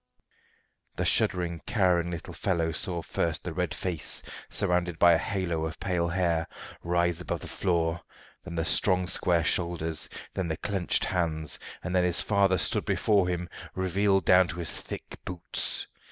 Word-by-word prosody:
The - - -1
shuddering, 85 -2 +2
cowering 90 -7 +2
little 85 -2 -6
fellow 85 -3 0
saw 85 +1 -2
first 85 -1 -1
the 90 - -5
red 90 +1 -1
face, 90 -5 -3 0.3
surrounded 90 -1 0
by 85 +1 +6
a 80 - +3
halo 90 -6 -2
of 80 - -8
pale 90 -3 0
hair, 85 -2 0 0.4
rise 85 0 0
above - - -4
the - - -8
floor, 85 -2 0 0.4
then 90 -2 -7
the 80 -1 -1
strong 90 +1 +5
square 90 -2 +1
shoulders, 80 -2 0 0.2
then 95 -2 -2
the 80 -1 -2
clenched 95 -4 0
hands, 80 -4 0 0.2
and 90 +1 -3
then 90 - +4
his 90 -1 +2
father 100 -3 +3
stood 80 - +2
before 100 -4 +2
him, 90 -1 -2 0.3
revealed 95 0 +1
down 90 0 +6
to 85 - -6
his 85 -3 -2
thick - - -8
boots. 90 -1 -2
90 Hz, 160 wpm, -28 LUFS, 85-90 Hz, 0.4 s, by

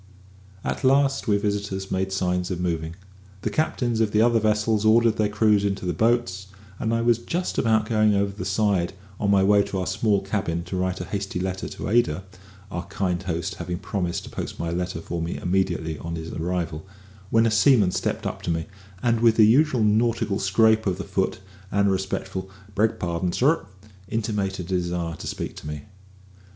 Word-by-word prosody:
At - - -3
last 135 0 +3
we 105 -2 +4
visitors 100 -2 -2
made 95 0 -1
signs 90 -1 0
of 90 -3 -3
moving. 85 -2 -2 0.5
The - - -1
captains 120 -7 0
of 110 -2 +3
the 105 - +3
other 120 -1 +4
vessels 110 0 +1
ordered 115 +1 +4
their 105 -1 +2
crews 105 -1 +3
into 100 -1 -1
their 90 - 0
boats, 110 -1 +1 0.3
and 110 - -1
I 115 0 +1
was 120 -1 +3
just 175 +9 -2
about 110 -2 +3
going 110 -2 +3
over 100 0 +1
the 100 -1 -6
side 95 -2 +1 0.3
on 100 - 0
my 100 -1 +5
way 100 +1 +5
to 100 - -3
our 95 - -1
small 105 0 +1
cabin 95 -4 -2
to 90 +2 -6
write 95 0 -1
a - - -4
hasty 100 -2 -3
line 95 0 -2
to - - -6
Ada 95 -6 +2 0.5
(our 90 -2 -4
kind 90 -2 -1
host 85 -3 -3
having 90 -1 -3
promised 90 -2 -3
to - - -10
post - - -5
my 85 0 -3
letter 90 -1 -3
for 85 0 -4
me 85 +1 -3
immediately 90 -4 -1
on 85 0 -5
his 80 0 -6
arrival), 85 -2 -3 0.5
when 115 0 +4
a 115 - +2
seaman 110 -3 +5
stepped - - -2
up - - -3
to - - -4
me, 80 -1 -1 0.4
and 115 -2 +2
with 115 -1 +5
the 110 - +7
usual 130 +1 +4
nautical 110 -1 +2
scrape 110 +2 +3
of 95 - 0
the - - -4
foot - - -1 0.3
and 100 0 +3
a - - +3
respectful 95 0 -3 0.2
"Beg 110 +3 +1
pardon, 85 0 -1
sir," 140 - +2 0.4
intimated 100 -4 -2
a - - -13
desire 85 -2 -1
to - - -7
speak - - -4
to - - -8
me. 75 -1 -5
100 Hz, 195 wpm, -24 LUFS, 90-110 Hz, 0.5 s, the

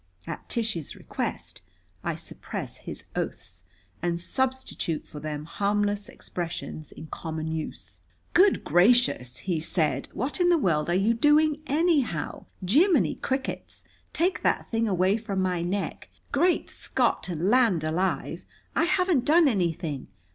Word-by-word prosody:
At - - -7
Tish's 220 - -2
request - - -5 0.4
I - - -1
suppress - - -6
his - - -8
oaths, - - -5 0.4
and 170 0 0
substitute 260 - -2
for 150 - -9
them 150 0 -4
harmless 205 +3 0
expressions 165 -3 -6
in - - -9
common 160 0 -4
use. 160 -1 -5 0.3
"Good 380 +2 +5
gracious!" 175 - +3
he 175 -4 0
said. 155 -4 0
"What 265 - -2
in 355 -1 +4
the 345 - +5
world 170 - +1
are 175 - +2
you 200 +5 +3
doing 300 +4 +4
anyhow? 290 - +1 0.2
Jimminy 310 - +4
crickets, 265 0 -3 0.3
take 360 +3 +1
that - - 0
thing 230 0 +1
away 190 +1 +3
from 210 -4 -3
my 180 -2 +1
neck! 190 +4 -3 0.2
Great 345 +5 +2
Scott - - 0
and 175 +2 0
land 230 -10 +4
alive, 170 +5 -1 0.3
I 320 - +3
haven't 360 -6 +2
done 320 +1 +6
anything! 170 - -1
200 Hz, 135 wpm, -27 LUFS, 165-270 Hz, 0.4 s, done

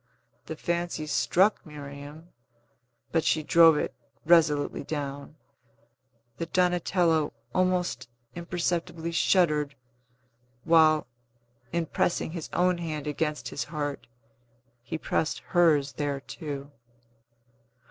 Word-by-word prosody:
The 160 - -5
fancy 170 -1 -2
struck 185 +7 +2
Miriam 145 +2 -10 0.8
(but 165 -1 +2
she 155 - +1
drove 165 0 +6
it - - -2 0.3
resolutely 155 -4 +3
down) 145 0 -5 1.0
that 165 0 -5
Donatello 175 -3 +2 0.2
almost 180 -9 0 0.2
imperceptibly 170 -1 -2
shuddered, 150 -4 +2 0.9
while, 155 -2 +5 0.7
in 170 0 0
pressing 160 0 -1
his 165 -2 -6
own 180 0 +2
hand 155 -3 -4
against 150 +1 -2
his - - -4
heart, 150 -2 -4 0.7
he 125 +6 -5
pressed 160 0 -1
hers 155 -6 +3
there 145 -2 -2
too. 140 -1 -7
160 Hz, 95 wpm, -27 LUFS, 150-170 Hz, 1.0 s, drove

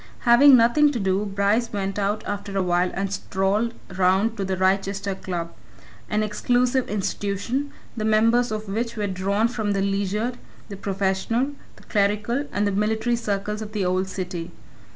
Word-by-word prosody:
Having 255 +3 +7
nothing 265 +6 +4
to 240 - -2
do, 195 +1 0
Bryce 200 +4 +1
went 195 -1 -2
out 205 +2 -1
after 200 -1 -4
a 190 - +2
while 180 0 +2
and 195 0 -2
strolled 200 +5 -1 0.2
round 190 +4 +2
to 200 - -1
the 190 -1 -2
Wrychester 195 +1 0
Club 175 -3 -5 0.6
an 210 0 +1
exclusive 245 +4 +1
institution, 210 +7 -2 0.2
the 220 - -3
members 225 +2 +3
of 215 0 -4
which 230 +4 -3
were 210 - -1
drawn 200 +3 0
from 220 -4 -2
the 195 - 0
leisured, 200 +5 -1 0.3
the 200 - -6
professional, 200 +6 -1 0.2
the - - -18
clerical, 210 +6 0
and 205 +2 0
the 200 - +1
military 220 +4 +1
circles 210 -1 -3
of 215 0 -7
the 205 -3 -1
old 185 +1 0
city. 180 -3 -5
205 Hz, 165 wpm, -24 LUFS, 195-230 Hz, 0.6 s, Having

